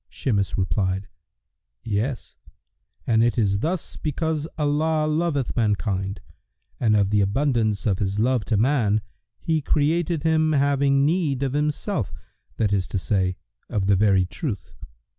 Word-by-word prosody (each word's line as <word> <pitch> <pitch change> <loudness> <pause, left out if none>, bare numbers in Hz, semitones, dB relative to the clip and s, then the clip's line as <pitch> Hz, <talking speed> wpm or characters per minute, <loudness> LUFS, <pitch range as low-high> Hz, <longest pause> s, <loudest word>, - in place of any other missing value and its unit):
Shimas 100 -7 -1
replied, 95 +1 -1 0.8
"Yes: 115 +4 -3 0.7
and 115 -1 +3
it 120 +1 +1
is 100 -3 +2
thus 170 - -3
because 155 0 -2
Allah 155 +1 +1
loveth 155 -3 0
mankind, 100 -3 -1 0.6
and 110 -3 +3
of 100 -1 +2
the 105 -1 +3
abundance 110 -1 +1
of 100 -4 +1
His 100 0 -1
love 120 +1 +2
to 110 - +1
man 110 -3 +2 0.4
He 160 -1 -1
created 155 +2 +1
him 160 -1 +2
having 140 -1 +3
need 150 -5 +1
of 135 -1 -1
Himself, 150 - -1 0.5
that 105 -2 +1
is 95 -3 0
to - - -3
say, 95 -1 0 0.3
of 100 -2 -1
the 100 0 +4
very 95 -2 +3
Truth. 100 - -5
120 Hz, 140 wpm, -24 LUFS, 100-150 Hz, 0.8 s, the